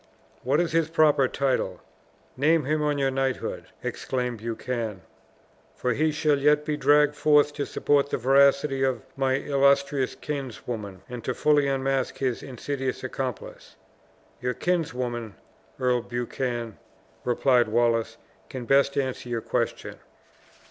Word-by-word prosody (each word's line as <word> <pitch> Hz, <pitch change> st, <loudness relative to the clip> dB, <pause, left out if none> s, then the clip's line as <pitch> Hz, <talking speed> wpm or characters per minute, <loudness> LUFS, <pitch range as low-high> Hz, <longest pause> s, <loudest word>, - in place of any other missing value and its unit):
"What 135 Hz, +4 st, +1 dB
is 175 Hz, -2 st, 0 dB
his 165 Hz, -1 st, +1 dB
proper 155 Hz, -4 st, +4 dB
title? 135 Hz, +1 st, -1 dB, 0.6 s
Name 150 Hz, +2 st, +2 dB
him, 155 Hz, +2 st, 0 dB
on 150 Hz, -1 st, +1 dB
your 135 Hz, -1 st, +1 dB
knighthood!" 135 Hz, -1 st, -2 dB, 0.2 s
exclaimed 125 Hz, -3 st, -3 dB
Buchan; 115 Hz, -2 st, -4 dB, 0.7 s
"for 125 Hz, -1 st, 0 dB
he 155 Hz, +6 st, +1 dB
shall 150 Hz, -1 st, +1 dB
yet 150 Hz, +1 st, +3 dB
be 150 Hz, -, -1 dB
dragged 145 Hz, +1 st, +4 dB
forth 150 Hz, -1 st, +4 dB
to 145 Hz, -1 st, -3 dB
support 140 Hz, -1 st, +1 dB
the -, -, -1 dB
veracity 135 Hz, +2 st, +3 dB
of 130 Hz, -4 st, 0 dB
my 135 Hz, -1 st, +1 dB
illustrious 140 Hz, -1 st, +2 dB
kinswoman, 115 Hz, -8 st, -6 dB
and 120 Hz, -2 st, -7 dB
to 130 Hz, -, -2 dB
fully 150 Hz, -2 st, +3 dB
unmask 135 Hz, -1 st, -1 dB
his 130 Hz, -3 st, -1 dB
insidious 135 Hz, 0 st, -4 dB
accomplice!" 130 Hz, -4 st, -6 dB, 0.7 s
"Your 125 Hz, 0 st, -1 dB
kinswoman, 125 Hz, -, -2 dB, 0.4 s
Earl 125 Hz, -2 st, +2 dB
Buchan," 120 Hz, -1 st, -4 dB, 0.4 s
replied 125 Hz, 0 st, +3 dB
Wallace, 115 Hz, 0 st, +1 dB, 0.3 s
"can 130 Hz, -2 st, -6 dB
best 140 Hz, +2 st, +3 dB
answer 130 Hz, -2 st, -2 dB
your 115 Hz, -1 st, -2 dB
question." -, -, -2 dB
135 Hz, 130 wpm, -26 LUFS, 125-145 Hz, 0.7 s, proper